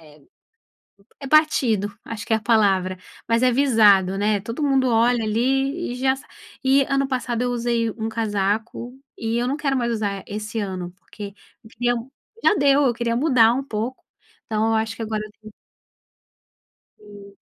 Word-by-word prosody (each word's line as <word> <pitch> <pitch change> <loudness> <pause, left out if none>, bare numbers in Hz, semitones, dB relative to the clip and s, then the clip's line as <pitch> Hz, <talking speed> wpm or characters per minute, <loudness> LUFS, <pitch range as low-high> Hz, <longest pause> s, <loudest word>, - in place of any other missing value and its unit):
é 150 - -22 1.0
é 275 - -7
batido, 230 -10 +2
acho 215 -1 -7
que - - -2
é - - +5
a - - -4
palavra, 195 -5 +2 0.3
mas 230 +2 +2
é 250 - +4
visado, 210 -8 +4
né. 205 0 +1
Todo 230 +9 -4
mundo 270 -2 +2
olha, 235 +1 +3
ali, 270 +7 0
e - - -4
já 265 +1 +1
s 270 +2 -8 0.4
e 270 +1 +4
ano 275 0 +1
passado 250 -3 -2
eu 245 - 0
usei 235 -1 0
um 220 0 -4
casaco 220 +3 -2 0.2
e 225 +1 -2
eu 240 - 0
não 270 +3 -1
quero 275 -2 -1
mais 235 -1 0
usar 200 -3 -3
esse 215 +2 -5
ano, 185 -4 -4
porque 200 0 -9 0.4
queria 245 +1 0 0.5
já - - +5
deu, 285 -1 +4
eu 255 -4 +3
queria 235 0 -2
mudar 240 -4 +4
um 265 - -2
pouco, 240 0 -4 0.4
então 220 0 0
eu 225 - +1
acho 220 0 -1
que - - -14
agora 215 -1 -3
eu 215 - -11
tenho 215 -1 -13 1.5
Sim. 205 -1 -14
230 Hz, 175 wpm, -22 LUFS, 210-260 Hz, 1.5 s, é